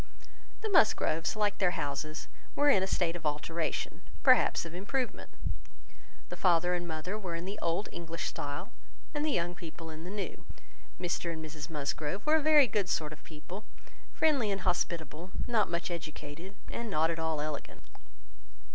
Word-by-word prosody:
The 440 - -1
Musgroves, 175 - +4
like 210 -2 +1
their 180 -2 +3
houses, 145 +3 -2 0.3
were 290 0 +6
in 195 - +5
a 190 - +1
state 175 -3 +1
of 170 - -6
alteration, 155 +2 -1 0.2
perhaps - - +6
of 165 - -7
improvement. 230 +8 -2 1.0
The - - -4
father 175 -1 +4
and 175 -1 -1
mother 165 +6 -3
were 180 -5 -3
in 170 +1 -4
the 200 +2 -4
old 170 +5 +1
English 165 -1 -4
style, 145 0 -3 0.4
and 295 0 0
the 310 - +2
young 175 - +1
people 165 -1 -8
in 155 +1 -8
the 180 - -6
new. 205 0 -4 0.6
Mr 175 -1 -1
and 160 -1 -5
Mrs 155 -1 -6
Musgrove 150 - -2
were 310 +1 +6
a - - +1
very 300 -1 +7
good 200 -4 0
sort 155 -1 0
of 155 - -14
people; 170 +6 -8 0.5
friendly 280 -9 +3
and 195 -1 0
hospitable, 170 -2 -1 0.2
not 220 -6 +3
much 170 +1 -1
educated, 165 +2 -6 0.2
and 235 -1 -3
not 160 -2 +3
at 165 - -3
all 160 -1 0
elegant. 150 -1 -4
175 Hz, 170 wpm, -32 LUFS, 160-200 Hz, 1.0 s, very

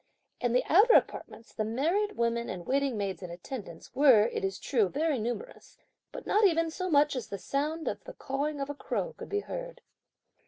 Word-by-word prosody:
In 245 -1 0
the 250 - +3
outer 420 +8 +6
apartments, 225 +1 0
the 215 - -2
married 330 - 0
women 235 0 0
and 175 -2 -6
waiting 275 -3 0
maids 200 -2 -3
in 180 - -7
attendance, 175 0 -8
were, 255 -6 +6
it - - -4
is 195 0 -1
true, 220 -3 +1
very 295 - 0
numerous; 245 - -6 0.3
but - - -8
not 425 - +2
even 330 -4 +3
so 370 +2 -3
much 295 -2 +4
as 250 - -4
the 200 - -5
sound 300 - -2
of - - -3
the - - -8
cawing 285 +2 -3
of 275 - -2
a - - -5
crow 485 - -3
could - - -10
be 410 0 0
heard. - - -7
275 Hz, 200 wpm, -29 LUFS, 225-330 Hz, 0.3 s, outer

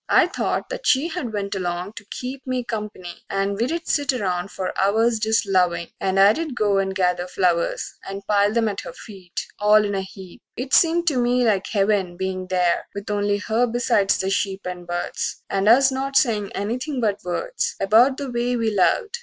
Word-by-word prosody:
I - - +6
thought - - -2
that - - -5
she 280 +6 +3
had 320 -10 -4
went 200 -2 -3
along 180 +1 -3
to 205 - -11
keep 255 +5 -7
Me 255 -1 -1
comp'ny, 210 -6 -6
and 195 0 0
we'd 310 +11 -2
set 285 -3 +1
around 185 -5 -2
for 185 -2 -4
hours 220 +4 +2
Just 220 0 +1
lovin', 180 -3 +1
and 190 0 0
I'd 245 +9 +3
go 205 -3 +2
and 190 0 -2
gather 180 -1 0
flowers 180 -2 0 0.2
And 195 0 -7
pile 205 0 +3
them 225 0 +1
at 200 -2 -3
her - - -9
feet, 190 -5 -8
all 210 +1 +5
in 205 - -2
a 195 - -1
heap. 190 -1 -11 0.2
It 260 +2 -5
seemed 340 +1 +4
to 280 - -2
me 245 +1 +2
like 200 -4 +1
heaven, 195 -4 0
bein' 185 0 -3
there 180 -2 +1
With 200 +1 -5
only 205 0 +1
her 225 +4 0
besides 225 -4 +2
the 190 0 -1
sheep 195 0 -1
and 180 -1 -6
birds, 175 0 -3
And 195 +2 +2
us 265 +3 +6
not 270 +1 -3
sayin' 215 -7 +1
anything 250 +7 -3
but 210 -3 -1
words 475 - -2
About 230 +7 +4
the 280 -3 -5
way 240 +1 0
we 225 -2 0
loved. 435 - +1
205 Hz, 195 wpm, -22 LUFS, 190-245 Hz, 0.2 s, I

